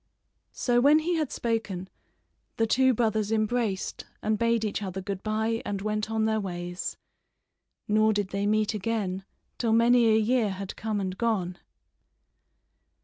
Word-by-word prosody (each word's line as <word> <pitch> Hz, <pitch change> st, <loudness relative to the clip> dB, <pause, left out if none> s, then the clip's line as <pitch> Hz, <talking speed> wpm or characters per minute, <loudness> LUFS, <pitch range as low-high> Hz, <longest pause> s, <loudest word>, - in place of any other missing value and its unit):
So 245 Hz, -1 st, +2 dB
when 290 Hz, +4 st, +6 dB
he 325 Hz, +3 st, 0 dB
had 305 Hz, -4 st, -1 dB
spoken 215 Hz, -6 st, -2 dB, 0.7 s
the 225 Hz, -, +3 dB
two 260 Hz, +4 st, +4 dB
brothers 220 Hz, -3 st, 0 dB
embraced 215 Hz, -2 st, -1 dB, 0.2 s
and 215 Hz, 0 st, +2 dB
bade 230 Hz, -1 st, +2 dB
each 210 Hz, -, -2 dB
other 190 Hz, -1 st, -4 dB
good 195 Hz, 0 st, -4 dB
bye 220 Hz, +1 st, -1 dB
and 200 Hz, -1 st, -3 dB
went 215 Hz, +1 st, -2 dB
on 220 Hz, 0 st, +1 dB
their 220 Hz, 0 st, +1 dB
ways; 175 Hz, -2 st, -4 dB, 0.9 s
nor 215 Hz, +1 st, +4 dB
did 205 Hz, -2 st, -1 dB
they 200 Hz, +1 st, -1 dB
meet 215 Hz, 0 st, +2 dB
again 200 Hz, -3 st, -2 dB, 0.3 s
till 230 Hz, -2 st, +1 dB
many 235 Hz, +1 st, +5 dB
a 220 Hz, -1 st, +5 dB
year 225 Hz, 0 st, +2 dB
had 195 Hz, 0 st, -6 dB
come 215 Hz, -1 st, -2 dB
and 185 Hz, -1 st, -3 dB
gone. 190 Hz, -5 st, -1 dB
215 Hz, 150 wpm, -27 LUFS, 200-230 Hz, 0.9 s, when